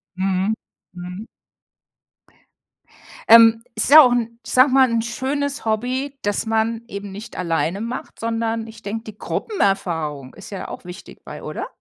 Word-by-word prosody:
Mhm, 190 +2 0 0.4
mhm. 180 +4 -8 2.0
Ähm, 225 0 +8
es 215 - 0
ist - - -2
ja 310 +1 +12
auch 250 -2 +4
'n, 230 -1 -2
ich - - -7
sage 255 +2 +6
mal, 265 -1 +5
'n 230 -1 +1
schönes 275 +5 -3
Hobby, 255 +6 -2
das 205 +1 -1
man 225 +1 0
eben 200 -1 -7
nicht 210 +4 -9
alleine 170 +2 -1
macht, 235 +2 -6
sondern 225 0 -2
ich 220 - -13
denke, 220 +2 -4
die 215 -2 -11
Gruppenerfahrung 165 - -2
ist 195 - -12
ja 195 - -6
auch - - -9
wichtig 180 0 -11
bei, - - -9
oder? - - -5
225 Hz, 160 wpm, -21 LUFS, 195-235 Hz, 2.0 s, ja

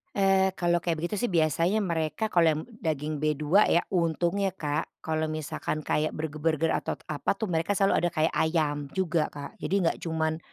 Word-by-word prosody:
Eee, 190 -1 +3
kalau 175 -1 +2
kayak 170 -1 -1
begitu 190 +5 -1
sih, 245 - +1
biasanya 170 +5 +2
mereka 165 +4 -1
kalau 170 -2 +4
yang 155 - -3 0.2
daging 150 -2 -2
B2 155 +6 +3
ya. 170 - +3
Untungnya, 175 +2 0
Kak, 150 -3 -2 0.2
kalau 160 0 -1
misalkan 155 0 -3
kayak 155 +1 0
burger-burger 155 +1 -1
atau, - - -1 0.2
apa 150 +6 0
tuh, 205 -3 -3
mereka 165 +5 0
selalu 195 0 +3
ada 175 - +1
kayak 155 +1 +2
ayam 150 -3 0
juga, 170 -4 +1
Kak. 145 -1 -9
Jadi 195 - -1
enggak 165 - +1
cuman 160 -1 -1
165 Hz, 175 wpm, -27 LUFS, 155-180 Hz, 0.2 s, kalau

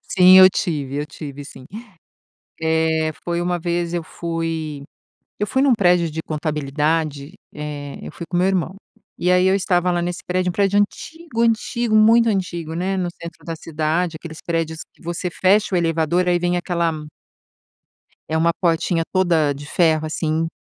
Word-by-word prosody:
Sim, 185 -1 +6
eu 185 0 +10
tive. 145 -7 -2
Eu 145 +1 -2
tive, 145 -1 -8
sim. 130 -2 -12 0.9
Eh, 160 0 +1
foi 170 0 -1
uma 175 0 -1
vez, 170 0 -2
eu 170 - -1
fui 165 -3 -4 0.6
eu 210 - 0
fui 265 +6 +1
num 270 -4 +5
prédio 175 -5 +3
de 160 - -4
contabilidade, 150 0 -2 0.2
eh, 145 -1 -6
eu - - -8
fui 170 - -8
com 175 - -2
o - - +3
meu 185 - +3
irmão. 185 -1 -1 0.4
E 180 - +1
aí 180 0 +4
eu 190 - +4
estava 180 -2 +1
lá 175 -1 0
nesse 175 +1 -3
prédio 180 0 0
um - - -4
prédio 200 +2 +2
antigo, 280 +6 -3
antigo, 230 0 +1
muito 230 +2 +6
antigo, 175 -6 -2
né. 190 +3 -1
No 180 - -1
centro 170 0 -11
da 165 -1 -5
cidade, 160 +2 -1
aqueles 160 -1 -9
prédios 165 -1 -2 0.2
você 175 +1 -4
fecha 195 +2 +2
o - - +3
elevador 165 +1 +1
e - - +2
aí 175 - +2
vem 175 0 0
aquela 170 -2 0 1.4
É 160 - -1
uma 165 +1 +3
portinha 170 -1 +1
toda 170 -6 +2
de 145 +1 -9
ferro, 160 -1 +2
assim. 160 +1 -1
170 Hz, 175 wpm, -21 LUFS, 160-180 Hz, 1.4 s, eu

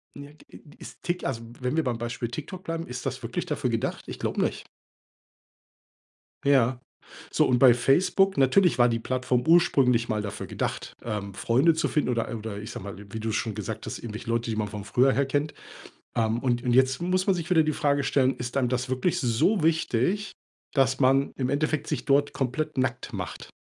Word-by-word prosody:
Ja, 140 0 -9
g 155 - -21 0.3
ist, - - -12
Tik 175 +1 -2
also, 125 -4 -2 0.2
wenn 125 +4 -1
wir 160 - +3
beim 120 -2 -1
Beispiel 120 +1 -3
TikTok 155 +9 -7
bleiben, 165 0 -3
ist 125 +1 -7
das 130 -1 -4
wirklich 120 +11 -3
dafür 150 -6 -1
gedacht? 115 -1 -2
Ich - - -7
glaube - - -1
nicht. - - -2 1.8
Ja. 130 -3 +3 0.5
So - - +2
und 125 -1 +2
bei 130 -2 +8
Facebook 185 +9 +2
natürlich 140 +5 +4
war 120 - +6
die 115 -1 0
Plattform 125 +1 0
ursprünglich 135 -8 +4
mal 110 -2 -1
dafür 105 0 -6
gedacht, - - -4
ähm, 105 -3 -4
Freunde 130 - +3
zu 160 - 0
finden 150 - 0
oder 120 -2 -1
oder 110 -2 -6
ich 105 - -7
sage - - -7
mal, 100 - -7
wie 105 +2 -8
du's 110 -1 -2
schon 110 - -1
gesagt 110 +1 -5
hast, - - -5
irgendwelche 115 0 -7
Leute, 115 0 0
die 110 - -1
man 105 -1 -1
von 105 -1 -7
früher 130 +5 +3
her 140 +1 +1
kennt. 145 +2 -1 0.6
Ähm, 115 0 +1
und 120 -2 0
und 125 - +1
jetzt 130 +2 +3
muss 185 +2 0
man 195 - +4
sich 170 -2 -4
wieder 170 -3 +5
die 155 0 0
Frage 145 -1 +1
stellen, 135 -1 +2
ist 125 +2 -5
einem 130 -3 +2
das 125 +1 -1
wirklich 130 +7 0
so 130 - +2
wichtig, 160 - +1 0.4
dass 135 -1 +2
man 135 +1 +3
im 130 -1 -1
Endeffekt 155 +2 0
sich - - -3
dort 140 +1 +2
komplett 145 +4 -2
nackt 130 0 -1
macht? 90 -5 -6
130 Hz, 205 wpm, -26 LUFS, 115-150 Hz, 1.8 s, bei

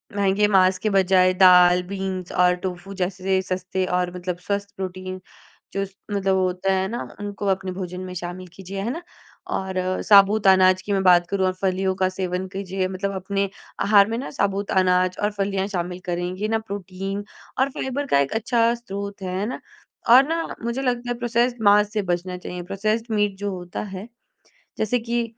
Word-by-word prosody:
महँगे 200 +1 +2
माँस 190 -2 +4
के 215 - 0
बजाय 185 -2 +4
दाल, 180 -1 +6
बीन्स 190 -1 -4
और 180 0 +3
टोफू 185 +1 -5
जैसे 190 +1 0
सस्ते 185 0 -2
और 180 0 -1
मतलब 180 -1 -4
स्वस्थ 200 0 -2
प्रोटीन 185 0 -5 0.5
जो 195 - -1 0.3
मतलब 195 -1 +1
वो 190 - +2
होता 185 +1 0
है 190 0 0
ना, 235 +4 -4 0.2
उनको 205 0 -5
अपने 190 0 -2
भोजन 180 -1 -5
में 185 0 -6
शामिल 175 +1 -6
कीजिए, 195 +1 -6
है 215 - -2
ना? 330 - -5 0.5
और 185 -1 -2
साबूत 200 0 +6
अनाज 185 -1 +5
की 205 - -5
मैं 195 - +2
बात 175 -2 +6
करूँ 195 -1 +1
और 185 - 0
फलियों 190 0 +1
का 185 0 +1
सेवन 185 0 -3
कीजिए 190 -1 -2
मतलब 190 +1 -3
अपने 195 +1 -1 0.3
आहार 200 -1 +6
में 225 - -2
ना 260 - -5
साबूत 200 -5 -1
अनाज 185 -1 +2
और 210 - +2
फलियाँ 195 -1 -1
शामिल 180 -2 -3
करें, 175 -1 -2
ये 205 +3 -2
ना 225 0 +1
प्रोटीन 195 -1 -5 0.4
और 265 +1 +3
फाइबर 265 +2 -3
का 140 - +3
एक 140 0 0
अच्छा 230 +1 +2
स्रोत 200 -4 -7
है, 185 -1 -3
है 200 - -1
ना? 245 - -4 0.5
और 250 +3 +9
ना 330 +1 -2
मुझे 235 +3 -2
लगता 245 -2 -1
है 240 - -2
प्रोसेस्ड 240 0 0
माँस 205 0 +5
से 215 - +1
बचना 180 +1 -4
चाहिए, 180 0 -6
प्रोसेस्ड 215 +5 -1
मीट 205 -1 +1
जो 205 0 -3
होता 180 -1 -6
है। 190 +4 -7 0.7
जैसे 220 +3 +1
कि 235 0 -1
195 Hz, 190 wpm, -23 LUFS, 185-205 Hz, 0.7 s, और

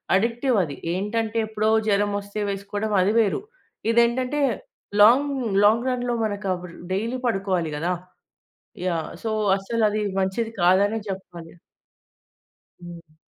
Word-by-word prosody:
Addictive 235 +4 +1
అది. 145 -4 -5 0.2
ఏంటంటే, 220 +4 -2
ఎప్పుడో 215 0 0 0.2
జ్వరమొస్తే 205 0 0
వేసుకోవడం 200 +2 -3
అది 190 +3 +3
వేరు. 215 - +1 0.5
ఇదేంటంటే 250 +5 +2 0.6
లాంగ్ 265 +7 +6 0.3
లాంగ్ 230 +4 +3
రన్‌లో 245 -1 -1
మనకవర్ 185 -4 -3 0.2
డైలీ 230 +6 -2
పడుకోవాలి 190 -7 0
గదా! 170 +4 0 0.9
యాహ్! 165 -3 -2
సో 220 - 0 0.3
అస్సలు 220 +3 0
అది 210 0 -1 0.2
మంచిది 225 +4 -2
కాదనే 195 +5 +4
చెప్పాలి. 175 -4 -8 1.3
హ్మ్. 170 -2 -11
205 Hz, 110 wpm, -24 LUFS, 190-230 Hz, 1.3 s, లాంగ్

